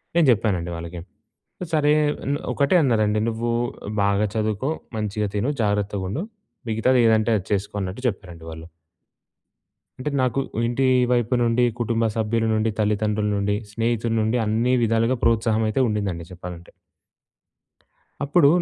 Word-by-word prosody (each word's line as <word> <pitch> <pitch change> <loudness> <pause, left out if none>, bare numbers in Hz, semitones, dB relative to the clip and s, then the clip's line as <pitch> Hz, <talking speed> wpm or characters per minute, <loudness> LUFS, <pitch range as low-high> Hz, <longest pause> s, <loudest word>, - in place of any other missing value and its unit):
నేను 170 -2 +5
చెప్పానండి 95 -6 0
వాళ్ళకి. 85 +1 -7 0.7
సరే 150 -1 +3 0.4
నె 145 - +1 0.2
ఒకటే 140 +5 +2
అన్నారండి 110 -5 +2
"నువ్వు 115 +1 -1 0.5
బాగా 100 +1 +2
చదువుకో 110 +4 -1 0.3
మంచిగా 105 -1 -2
తిను 105 +7 0
జాగ్రత్తగా 105 -2 0
ఉండు 125 - -3 0.5
మిగతాది 120 +4 +2
ఏదంటే 110 0 +3
అది 95 - -6
చేసుకో" 100 0 -1
అన్నట్టు 95 +5 -5
చెప్పారండి 90 -6 -5
వాళ్ళు. 80 0 -9 1.3
అంటే 150 +4 -3
నాకు 130 +1 +1 0.3
ఇంటి 120 +3 0 0.3
వైపు 120 0 +1
నుండి, 120 +1 +2 0.2
కుటుంబ 115 0 0
సభ్యుల 115 +1 0
నుండి, 110 +1 +1
తల్లిదండ్రుల 105 0 +1
నుండి, 100 +1 0 0.2
స్నేహితుల 115 +1 -1
నుండి 110 +3 +1
అన్ని 115 +4 +1
విధాలుగా 115 +2 +2
ప్రోత్సాహం 115 -1 +2
అయితే 120 +5 +1
ఉండిందండి 100 -6 -2
చెప్పాలంటే. 90 -1 -9 1.5
అప్పుడు 145 +2 +4
110 Hz, 130 wpm, -23 LUFS, 100-120 Hz, 1.5 s, నేను